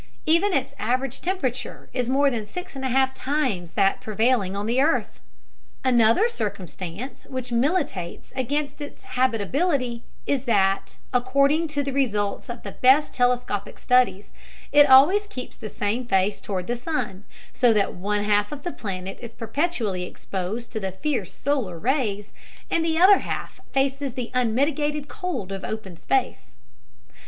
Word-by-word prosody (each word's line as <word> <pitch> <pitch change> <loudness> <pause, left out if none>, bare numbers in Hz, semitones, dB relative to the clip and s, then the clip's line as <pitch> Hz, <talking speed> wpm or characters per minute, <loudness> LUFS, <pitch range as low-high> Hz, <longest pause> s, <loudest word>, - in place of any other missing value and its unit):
Even 335 +6 +3
its 275 -6 0
average 255 +4 -1
temperature 270 -9 -3
is 250 -1 -1
more 275 +1 +3
than 230 -3 -2
six 360 - -8
and 265 - -6
a 260 - 0
half 265 +1 +2
times 255 - -1
that 195 0 +2
prevailing 215 -2 +1
on 200 +1 -2
the 240 +4 +2
earth! 320 +4 +1 0.6
Another 240 - +4
circumstance 200 - -5
which 255 -2 -5
militates 240 - -1
against 285 +3 -2
its 290 - -8
habitability 255 - 0 0.2
is 275 -2 0
that, 195 -5 +1 0.2
according 275 +6 +3
to 290 -2 -1
the 275 -1 -3
results 210 -8 0
of 240 0 -6
the - - -6
best 270 +4 +4
telescopic 245 -5 0
studies, 250 -5 +2 0.4
it 290 -1 +7
always 335 +11 +7
keeps 255 -11 -7
the 215 - -7
same 210 +6 -1
face 195 -3 +1
toward 185 -3 -3
the 240 - -1
sun, 240 - -3 0.3
so 245 -2 +4
that 210 -3 +2
one 205 +3 -1
half 205 0 +2
of 290 -1 -7
the 350 - -3
planet 190 -2 -5
is 235 - -6
perpetually 225 - -1
exposed 190 +5 -5
to 220 - -3
the 190 -2 -3
fierce 225 - -2
solar 250 -11 -1
rays, 215 - -1 0.4
and 330 - +2
the 325 -1 0
other 380 +4 +7
half - - -5
faces 270 -1 0
the 245 -2 -4
unmitigated 285 +5 +1
cold 330 - -4
of 195 -1 -5
open 215 -5 -5
space. 240 - -1
250 Hz, 155 wpm, -24 LUFS, 205-280 Hz, 0.6 s, it